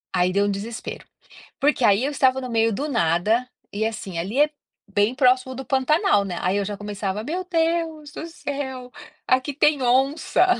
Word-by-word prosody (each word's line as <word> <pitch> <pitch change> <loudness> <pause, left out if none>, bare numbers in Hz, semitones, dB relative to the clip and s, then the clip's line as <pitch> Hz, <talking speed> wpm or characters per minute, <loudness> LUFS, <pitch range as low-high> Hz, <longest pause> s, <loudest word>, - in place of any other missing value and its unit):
Aí 180 0 +2
deu 200 +1 +2
um 205 - +1
desespero. 220 +4 -6 0.5
Porque 290 -2 +2
aí 205 +2 +4
eu 285 - -1
estava 265 -2 +2
no 255 - -5
meio 225 -1 +2
do 290 +9 -2
nada, 215 - +1 0.2
e 215 +2 -1
assim, 210 -6 -4
ali 200 +11 -2
é 300 0 +5 0.4
bem 205 +3 +2
próximo 260 0 +3
do 265 - -6
Pantanal, 270 - +2
né, 180 -3 -4
aí 185 +3 +1
eu 200 - 0
já 205 - -4
começava: 205 0 -4
"Meu 355 +7 -3
Deus 325 -3 -1
do 315 - -7
céu, 270 -6 -6 0.4
aqui 260 +3 +2
tem 295 0 +3
onça. 270 +8 +2
250 Hz, 180 wpm, -23 LUFS, 205-285 Hz, 0.5 s, é